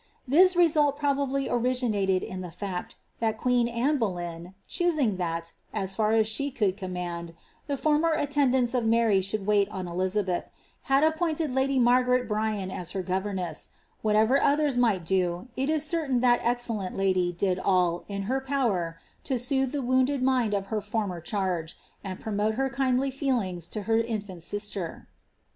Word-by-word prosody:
Thu 345 +8 +6
result 300 -5 +4
probably 280 -2 0
originaled 240 -5 0
in 185 0 -5
thi 180 - -5
fiiet, 180 +1 -5 0.2
that 220 -1 0
queen 245 0 +2
Anne 250 +5 0
Boleyn, 175 -4 -4
choosing 310 - +1
that^ 165 -2 -3 0.2
«s 195 0 -2
fiur 215 +1 +2
aa - - +6
ahe 220 +6 0
could 200 -5 +1
coa* 190 -2 -6
mand 170 -2 -5 0.2
— - - -35
the 285 -2 -1
former 305 +4 +2
attendants 265 -4 +1
of 250 -2 +1
Mary 225 -3 +3
should 195 +1 -2
wait 205 -1 +3
on 190 -3 -5
Elizabeth, 185 +1 -1 0.4
had 270 +2 +4
appointed 315 -1 +1
lady 265 +1 +1
Margaret 250 0 +3
Bryan 210 -3 -1
as 180 -2 -5
her 190 - -2
governess; 190 -1 -3 0.3
whatever 220 +5 +3
others 290 -1 +2
miglit 220 -8 +2
do, 180 +3 0
it 270 +2 -1
is 310 -1 +2
certain 300 -6 +1
that 245 -1 +4
excellent 235 -5 -2
lady 185 -2 +2
did 180 +1 0
all, 180 -3 +1
in 200 -1 -4
her 260 +6 -1
power, 225 -12 -1 0.3
to 265 -3 0
soothe 265 +1 0
the 285 -2 -2
wounded 260 +2 +2
mind 250 -5 +2
of 195 -1 -2
her 215 - 0
former 205 -4 -3
charge, 180 -3 -2 0.3
and 190 -2 -6
promote 215 0 -1
her 270 +2 0
kindly 265 +1 +1
feelingi 230 - -2
to 210 +1 -4
her 225 +2 +2
infant 205 -6 -4
sister. 205 -2 -3
220 Hz, 165 wpm, -27 LUFS, 190-265 Hz, 0.4 s, Thu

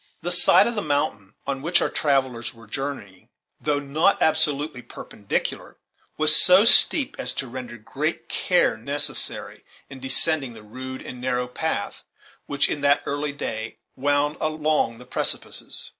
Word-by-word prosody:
The 175 - -1
side 180 +2 +5
of 235 - -1
the 210 - -2
mountain 105 - -2
on 135 -1 -3
which 170 +5 +2
our - - +1
travellers 130 -5 -1
were 115 0 -15
journeying, 105 -6 -6 0.3
though 150 -1 0
not 150 +7 +1
absolutely 150 -4 0
perpendicular, 105 -3 -5 0.4
was 155 0 +4
so 185 +5 +6
steep 270 +3 +7
as - - -2
to 135 - -4
render 125 -1 -8
great 110 - -4
care - - +1
necessary 140 +2 -3 0.3
in 135 - -9
descending 135 0 +1
the 110 -2 -13
rude 130 +4 -8
and 125 - -9
narrow 125 -1 -1
path 125 - -4 0.4
which, 140 0 +1
in 145 - -4
that 145 0 +3
early 145 +1 -2
day, 110 -5 -5 0.2
wound 145 +2 0
along 155 -6 0
the 125 - -13
precipices. - - -3
140 Hz, 150 wpm, -23 LUFS, 125-150 Hz, 0.4 s, steep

